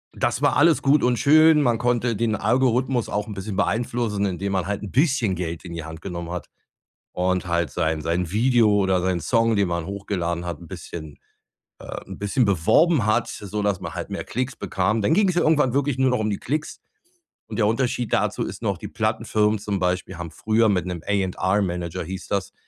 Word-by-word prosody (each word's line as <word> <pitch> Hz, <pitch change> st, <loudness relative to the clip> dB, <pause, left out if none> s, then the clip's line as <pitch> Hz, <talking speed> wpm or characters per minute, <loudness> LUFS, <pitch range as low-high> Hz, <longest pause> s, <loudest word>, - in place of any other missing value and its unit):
Das -, -, -1 dB
war -, -, +3 dB
alles 160 Hz, +1 st, +4 dB
gut 140 Hz, +2 st, +4 dB
und 125 Hz, -1 st, +2 dB
schön. 155 Hz, +1 st, +6 dB
Man 120 Hz, -3 st, +2 dB
konnte 120 Hz, -1 st, +1 dB
den 110 Hz, +1 st, 0 dB
Algorithmus 125 Hz, +1 st, +1 dB
auch 105 Hz, +1 st, -2 dB
'n 105 Hz, -, -6 dB
bisschen 95 Hz, +1 st, -5 dB
beeinflussen, 110 Hz, +2 st, 0 dB
indem 95 Hz, +2 st, -3 dB
man 95 Hz, -1 st, -1 dB
halt 105 Hz, 0 st, -3 dB
'n 100 Hz, -, -6 dB
bisschen 130 Hz, -, +2 dB
Geld 85 Hz, 0 st, -5 dB
in 85 Hz, -, -7 dB
die 85 Hz, -2 st, -5 dB
Hand 80 Hz, 0 st, -9 dB
genommen 85 Hz, -3 st, -5 dB
hat 90 Hz, -3 st, -6 dB, 0.6 s
und 90 Hz, 0 st, 0 dB
halt 85 Hz, -1 st, 0 dB
sein 80 Hz, -2 st, -1 dB
sein 85 Hz, +1 st, -1 dB
Video 115 Hz, +1 st, +3 dB
oder 95 Hz, -1 st, +2 dB
seinen 90 Hz, -2 st, 0 dB
Song, 115 Hz, +3 st, +2 dB
den 100 Hz, -3 st, +2 dB
man 85 Hz, -1 st, -2 dB
hochgeladen 90 Hz, -4 st, -3 dB
hat, 85 Hz, -4 st, -5 dB
'n -, -, -12 dB
bisschen, 80 Hz, -4 st, -8 dB, 0.6 s
äh, -, -, -7 dB
'n -, -, -9 dB
bisschen 105 Hz, +5 st, +1 dB
beworben 115 Hz, -, +3 dB
hat, 110 Hz, -, +2 dB
sodass 100 Hz, -1 st, -2 dB
man 85 Hz, -, -6 dB
halt -, -, -5 dB
mehr -, -, -4 dB
Klicks 130 Hz, +1 st, -3 dB
bekam. 105 Hz, +4 st, -1 dB
Dann 150 Hz, -, +2 dB
ging's 190 Hz, -3 st, +3 dB
ja 175 Hz, -, +2 dB
irgendwann 145 Hz, -5 st, +3 dB
wirklich 140 Hz, -2 st, 0 dB
nur 130 Hz, 0 st, +3 dB
noch 125 Hz, -, 0 dB
um 110 Hz, 0 st, 0 dB
die 100 Hz, -, -2 dB
Klicks. 150 Hz, +4 st, -3 dB, 0.7 s
Und -, -, -5 dB
der 105 Hz, -, +3 dB
Unterschied 120 Hz, 0 st, -1 dB
dazu -, -, +1 dB
ist -, -, -7 dB
noch, -, -, 0 dB
die -, -, -6 dB
Plattenfirmen 105 Hz, 0 st, 0 dB
zum 100 Hz, -1 st, -2 dB
Beispiel 90 Hz, 0 st, -1 dB
haben 85 Hz, -2 st, -6 dB
früher 110 Hz, +5 st, +2 dB
mit 90 Hz, -3 st, +1 dB
'nem 85 Hz, -2 st, -5 dB
A&R 100 Hz, 0 st, 0 dB
Manager 90 Hz, 0 st, -3 dB
hieß 95 Hz, +3 st, -7 dB
das 100 Hz, -2 st, -2 dB
100 Hz, 205 wpm, -23 LUFS, 90-120 Hz, 0.7 s, schön